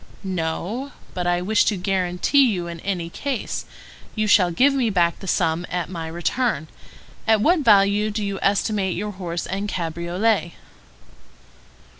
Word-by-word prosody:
"No; 190 +9 -3 0.2
but 180 -1 -2
I 175 0 +1
wish 215 +3 +3
to 210 - +1
guarantee 185 +8 +2
you 180 -4 -2
in 170 -1 -7
any 180 -2 -3
case. 260 +7 -4 0.5
You 215 -1 0
shall 200 -4 +5
give 260 +11 +3
me 255 -4 +1
back 175 -4 +1
the 195 - -9
sum 165 -1 +1
at 180 0 -3
my 165 -3 -5
return. 170 +2 -1 0.6
At 220 -1 +5
what 335 - +3
value 210 -4 +4
do 210 0 -2
you 200 -1 -3
estimate 200 -1 +1
your 210 +3 -3
horse 175 -3 -4
and 200 +2 -3
cabriolet?" 170 +2 -1
195 Hz, 150 wpm, -22 LUFS, 175-215 Hz, 0.6 s, shall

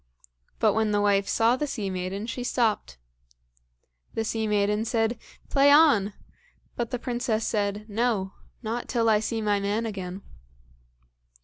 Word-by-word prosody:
But - - +3
when 220 0 +1
the 205 0 +1
wife 200 -1 +2
saw 230 +2 +3
the 295 +3 -2
sea 210 -8 -3
maiden 185 +3 -4
she 245 +2 -4
stopped. 225 - 0 1.2
The 225 - 0
sea 220 0 -1
maiden 210 +1 +1
said, 225 0 0 0.3
"Play 280 0 +5
on!" 285 -10 +5 0.6
but 235 -2 -2
the 250 - -2
princess 240 -2 -2
said, 205 -1 -1
"No, 210 -3 -1 0.3
not 230 +2 -3
till 230 -2 +1
I 210 - +4
see 225 +1 -2
my 205 -1 +2
man 205 +3 -1
again." 190 -3 -5
220 Hz, 145 wpm, -26 LUFS, 205-235 Hz, 1.2 s, Play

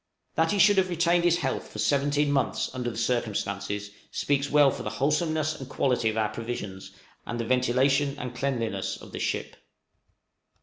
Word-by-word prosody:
That 165 0 +2
he 205 - +1
should 205 0 +6
have 185 -1 +1
retained 170 0 +2
his 170 -1 +4
health 175 - -2
for - - -9
seventeen 145 +1 +2
months, 135 -2 0
under 125 -2 -2
the 110 - -7
circumstances, 100 -4 -2 0.2
speaks 140 0 0
well 145 -2 +5
for - - -6
the - - -3
wholesomeness 155 +1 0
and 135 -1 -8
quality 125 -4 +1
of 110 - -3
our 110 -1 +1
provisions, 110 -4 -6 0.3
and 120 - -5
the 115 - -1
ventilation 130 +3 +2
and 125 -1 -5
cleanliness 125 -3 -2
of - - -12
the - - -6
ship. - - -2
135 Hz, 175 wpm, -27 LUFS, 115-150 Hz, 0.3 s, should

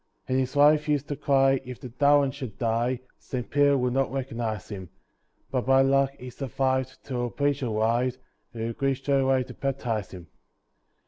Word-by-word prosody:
And 130 +1 +1
his 130 +1 -2
wife 150 +1 +5
used 145 -1 +1
to 145 - -1
cry, 135 -1 +3
"If 125 -2 -8
the 125 - -8
darlin' 140 +2 +3
should 130 -6 -7
die 120 +2 0 0.2
Saint 125 -2 -5
Peter 145 -1 +4
would 125 -1 0
not 135 0 +1
recognise 115 -6 -3
him." 95 -4 -7 0.6
But 130 -2 -1
by 135 0 +6
luck 135 0 +3
he 125 0 -9
survived 130 0 -1
till 120 -3 -2
a - - -5
preacher 140 0 0
arrived, 115 +3 +1 0.4
Who 115 -1 -3
agreed 135 +3 0
straightaway 135 -1 +2
to - - -10
baptise 125 -7 -2
him. 90 -3 -10
130 Hz, 175 wpm, -26 LUFS, 120-135 Hz, 0.6 s, by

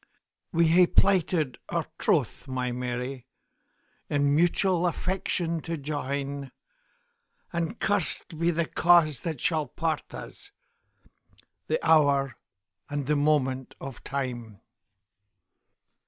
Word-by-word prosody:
We 170 -1 +3
hae 175 +2 +6
plighted 175 -9 +2
our - - -1
troth, - - 0
my 130 -1 -2
Mary, 125 +1 -4 0.8
In 145 -1 +2
mutual 175 +2 +3
affection 175 -2 -1
to 165 +1 -4
join; 140 -1 -4 1.0
And 170 +6 -2
curst 205 -4 0
be 170 +1 +2
the 170 -1 +1
cause 165 -5 +4
that 160 -2 -4
shall 160 -1 +1
part 160 -2 -2
us! - - -8 1.2
The 475 - +1
hour 140 -5 +4 0.5
and 145 -1 -2
the 150 +2 +1
moment 135 -3 +1
o' 135 - -6
time! 120 -5 -5
150 Hz, 105 wpm, -27 LUFS, 135-170 Hz, 1.2 s, hae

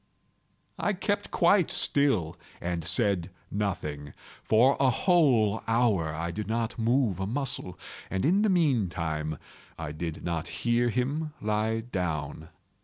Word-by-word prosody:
I 205 - +1
kept 205 +2 -2
quite 175 0 +3
still 110 - +1 0.2
and 85 -1 -3
said 100 -1 +1 0.2
nothing. 75 -8 -3 0.3
For 125 +5 +4
a 135 -1 +4
whole 125 - +3
hour 115 -9 +2
I 80 +3 -3
did 105 +4 -5
not 115 +1 -2
move 115 -4 +1
a 95 - -2
muscle, 125 -7 -2 0.3
and 95 +4 -1
in 185 +7 +4
the 215 - +3
meantime 85 - 0 0.4
I 80 -2 -5
did 80 +1 -5
not 85 -2 -2
hear 120 +7 +1
him 140 +6 -1
lie 110 +1 0
down. 80 -8 -4
110 Hz, 130 wpm, -28 LUFS, 85-130 Hz, 0.4 s, For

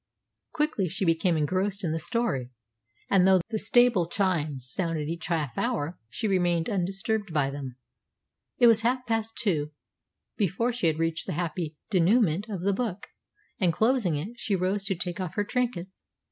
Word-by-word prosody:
Quickly 300 - 0
she 190 +3 -2
became 165 0 +2
engrossed 190 +6 0
in 165 - 0
the 165 - -1
story, 165 - -1 0.6
and 190 -2 +5
though 190 -1 +6
the 220 - -1
stable 235 -5 +4
chimes 155 - -1
sounded 165 -5 -2
each 165 0 -4
half 155 -7 -1
hour 150 +5 -2
she 215 - -2
remained 175 -3 +1
undisturbed 195 +2 -1
by 145 -3 +1
them. 135 -3 -7 0.8
It 245 - +5
was 225 -1 +6
half 250 +2 0
past 225 -1 -1
two 155 -8 0 0.6
before 220 +4 0
she 230 -8 0
had 155 -1 +1
reached 160 -1 -1
the - - -2
happy 165 -1 -3 0.2
dénouement 195 +1 +3
of 190 -4 -4
the 200 +2 +1
book, 210 -3 -3 0.5
and, 180 -3 +3
closing 220 - +2
it, 205 +12 -5
she 205 - 0
rose 190 +2 -1
to 195 -1 0
take 175 0 -4
off 185 -3 -4
her 205 - +1
trinkets. 205 -5 -3
185 Hz, 170 wpm, -27 LUFS, 165-215 Hz, 0.8 s, though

